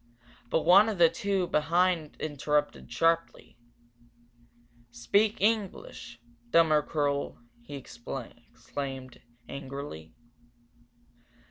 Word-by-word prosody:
But 160 - +1
one 195 +6 +7
of 210 - -3
the 170 -1 +6
two 195 -1 -1
behind 170 0 +1
interrupted, 145 -2 -1
sharply. 165 +6 0 1.3
"Speak 200 - +1
English, 205 - -1 0.3
dummer 160 0 +5
kerl 145 -1 -1 0.2
he 145 +5 -9
exclaimed, 130 +1 -8 0.3
angrily. 140 - -7
150 Hz, 80 wpm, -29 LUFS, 140-180 Hz, 1.3 s, one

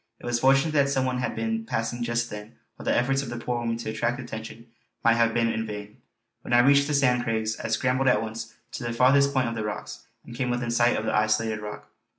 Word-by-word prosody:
It - - -12
was 120 -1 0
fortunate 135 +5 +4
that 140 -2 +3
some 135 -2 +1
one 125 -1 -1
had 125 - -2
been 225 0 -2
passing 120 - -3
just 120 0 -1
then, 105 +2 -8 0.2
or - - -8
the - - +1
efforts 135 +3 +1
of 135 - -6
the 120 - -5
poor 120 0 -2
women 115 -1 -2
to 115 -2 -4
attract 120 +4 -1
attention 115 -2 -8 0.4
might 115 - +5
have 115 0 +3
been 115 +1 +1
made - - -2
in 110 - -3
vain. 105 0 -7 0.4
When - - -4
I 120 - +7
reached 140 +2 +5
the 150 - 0
Sand 125 -3 +3
Craigs 110 -1 -1
I - - -4
scrambled 130 +4 +1
at 125 - +4
once 110 0 -6 0.2
to - - -6
the 120 -1 -2
farthest 140 +3 +4
point 130 -3 +1
of 115 - -2
the 110 -2 -3
rocks, 105 0 -6 0.2
and 120 - -10
came 125 0 -1
within 120 -1 -1
sight 120 +1 +3
of 110 - -3
the - - -1
isolated 110 +1 +1
rock. 105 0 -8
120 Hz, 255 wpm, -26 LUFS, 115-130 Hz, 0.4 s, I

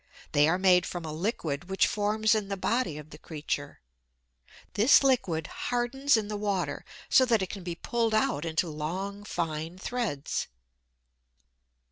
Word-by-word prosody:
They 145 +1 +4
are 170 +3 +2
made 185 -2 +4
from 175 -2 -5
a 155 - -5
liquid 170 -3 -3
which 190 - +3
forms 215 +1 +1
in 215 -2 0
the 200 0 -3
body 190 -6 0
of 150 0 -10
the 150 - -11
creature. 145 -3 -5 0.9
This 230 +7 +6
liquid 190 -12 +1
hardens 245 - 0
in 215 -2 -2
the 210 0 -3
water 200 -3 -2 0.2
so 260 - +6
that 230 -5 +2
it 185 - -4
can 200 - -7
be 175 -1 -5
pulled 230 +5 0
out 150 -8 +1
into 165 +1 0
long, 185 +7 -4
fine 165 -3 -3
threads. 200 - -2
190 Hz, 155 wpm, -28 LUFS, 160-220 Hz, 0.9 s, This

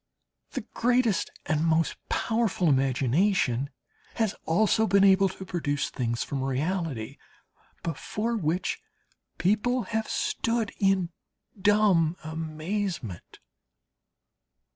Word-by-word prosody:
The - - -4
greatest 240 -4 +2 0.2
and 155 0 +1
most 165 0 +2
powerful 220 -7 +1
imagination 135 - +2 0.5
has 220 -3 +1
also 215 +5 +3
been 200 -1 +4
able 195 0 +5
to 190 +1 -9
produce 150 -6 -2
things 120 -2 -1
from 140 -2 -3
reality, 135 - -2 0.7
before 210 +8 -2
which 175 -3 -1 0.6
people 220 +6 +1
have 220 +2 -2
stood 230 -2 0
in 195 -3 +2 0.5
dumb 195 -5 +4
amazement. 160 - -4
180 Hz, 95 wpm, -27 LUFS, 155-210 Hz, 0.7 s, able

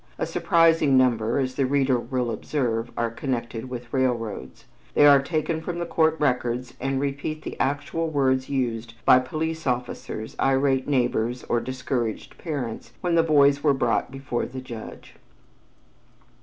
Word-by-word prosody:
A - - -1
surprising 165 -5 +3
number, 120 -2 +2
as 130 -2 0
the 130 0 0
reader 135 -2 +2
will 125 -1 -2
observe, 115 -1 -2
are 115 -1 0
connected 120 -1 -4
with 120 -1 -8
railroads. 115 - -2 0.3
They 145 - +6
are 140 -1 +8
taken 160 +2 -2
from 170 +1 -4
the 170 - -2
court 160 -1 +2
records 125 -3 0
and 135 +1 -1
repeat 140 +2 -3
the - - -6
actual 145 +4 -1
words 130 -3 +1
used 120 -4 -2
by 130 - +7
police 160 +4 -3
officers, 120 -3 -3
irate 135 -1 +2
neighbors, 125 -3 0
or 120 - 0
discouraged 120 -2 -3
parents, 125 -7 -5
when 175 -1 0
the 165 - +5
boys 145 -3 +4
were 145 -3 +4
brought 120 -3 0
before 135 -2 -3
the 130 +1 -7
judge. 120 -4 -10
130 Hz, 150 wpm, -25 LUFS, 120-145 Hz, 0.3 s, are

